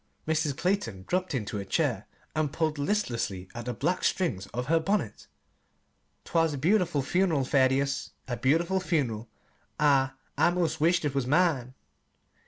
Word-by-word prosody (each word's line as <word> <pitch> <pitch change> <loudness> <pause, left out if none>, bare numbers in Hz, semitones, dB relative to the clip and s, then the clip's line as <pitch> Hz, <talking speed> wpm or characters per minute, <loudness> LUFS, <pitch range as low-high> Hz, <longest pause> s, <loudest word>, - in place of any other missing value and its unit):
Mrs. 155 -3 0
Clayton 145 - -1
dropped 185 -4 -1
into 105 -4 -3
a - - -3
chair - - -1 0.3
and 155 -2 0
pulled 155 -2 -1
listlessly 120 - -1
at 120 -1 -6
the 125 - -2
black 175 +9 -1
strings 115 - 0
of 125 +1 -4
her 165 +4 +3
bonnet. 200 +6 -2 1.0
"'T - - -13
was 165 -3 +3
a - - -5
beautiful 175 -2 +2
fun'ral, 165 -3 +1
Thaddeus 140 +1 +2 0.2
a 125 - -2
beautiful 165 +10 +2
fun'ral. 130 - -1 0.5
I 140 -3 +4 0.3
I - - +5
'most 165 -3 -1
wished 170 +1 +3
it 145 - 0
was 135 -3 -1
mine." 145 -5 +2
150 Hz, 155 wpm, -28 LUFS, 130-175 Hz, 1.0 s, I